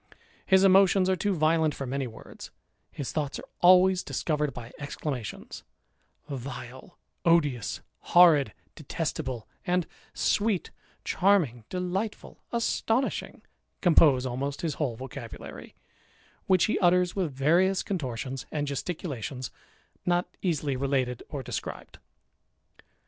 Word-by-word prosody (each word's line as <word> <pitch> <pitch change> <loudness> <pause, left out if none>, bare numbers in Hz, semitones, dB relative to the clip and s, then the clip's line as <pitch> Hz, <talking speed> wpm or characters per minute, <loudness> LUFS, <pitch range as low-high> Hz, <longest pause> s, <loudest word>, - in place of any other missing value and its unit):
His 190 0 +5
emotions 190 -1 +5
are - - +3
too 200 +1 0
violent 155 -1 +2
for 135 - -4
many 135 +1 -2
words; 110 - -11 0.4
his 140 - -5
thoughts 145 -3 -2
are - - -9
always 185 +1 +6
discovered 150 -2 -1
by 120 -2 -9
exclamations, 140 -5 -5 0.7
Vile^ 130 +3 -7 0.3
odious^ 145 -10 +2 0.3
horridy 155 -10 +7 0.2
detestable^ 135 -6 -4 0.2
and 180 -1 +1 0.3
sweety 205 -3 +1 0.3
charming^ 165 - +2
delighijul, 185 +4 -3
astonishing, 235 +2 -1 0.4
compose 150 -7 +5
almost 140 +3 -3
his 165 -3 -1
whole 130 -6 0
vocabulary, 130 -1 -9 0.7
which 185 -2 +4
he 215 - +1
utters 180 -1 +3
with 185 -6 -1
various 170 +8 +2
contortions 135 - -4
and 150 -1 -1
gesticulations 140 - -4 0.5
not 175 0 +1 0.2
easily 150 -6 0
related 130 -2 -1
or 140 -4 -5
described. - - -6
150 Hz, 110 wpm, -28 LUFS, 130-180 Hz, 0.7 s, horridy